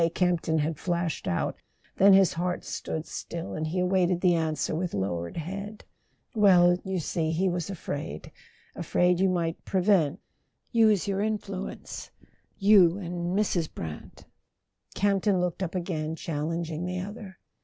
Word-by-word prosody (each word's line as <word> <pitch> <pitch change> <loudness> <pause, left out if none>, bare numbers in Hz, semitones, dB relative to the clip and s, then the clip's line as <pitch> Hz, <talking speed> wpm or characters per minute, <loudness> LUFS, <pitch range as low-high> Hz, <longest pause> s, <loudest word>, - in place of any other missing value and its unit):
Camp 180 -2 +2
ton 160 0 0
had 155 0 -1
flashed 170 -3 -2
out; 85 - -1 0.4
then 195 +1 +7
his 190 -2 +5
heart 175 +1 -2
stood 160 0 -4
still, 170 0 -6
and 155 0 -2
he 165 +4 -3
awaited 180 -1 +2
the 180 -2 +4
answer 160 -3 -1
with 170 - -2
lowered 85 - -3
head. 200 +6 -6 0.5
"Well, 180 -5 +5
you 190 -1 -2
see, 160 -1 -1
he 170 +4 +1
was 175 0 -2
afraid: 145 - -5 0.4
afraid 180 0 +2
you 190 0 +3
might 170 -2 -1
pre¬ 190 -2 0
vent... 180 -4 +3 0.5
use 220 -6 +4
your 195 0 0
influence... 205 -3 -4 0.5
you 195 -4 +6
and 175 -1 -3
Mrs. 180 -6 0
Brant.. 80 -2 -8 0.3
." - - -30
Campton 200 -1 +2
looked 180 +1 -2
up 185 -1 -3
again, 160 -3 -2
challenging 165 +2 -3
the 180 0 -3
other. 195 -1 -8
180 Hz, 150 wpm, -27 LUFS, 165-195 Hz, 0.5 s, then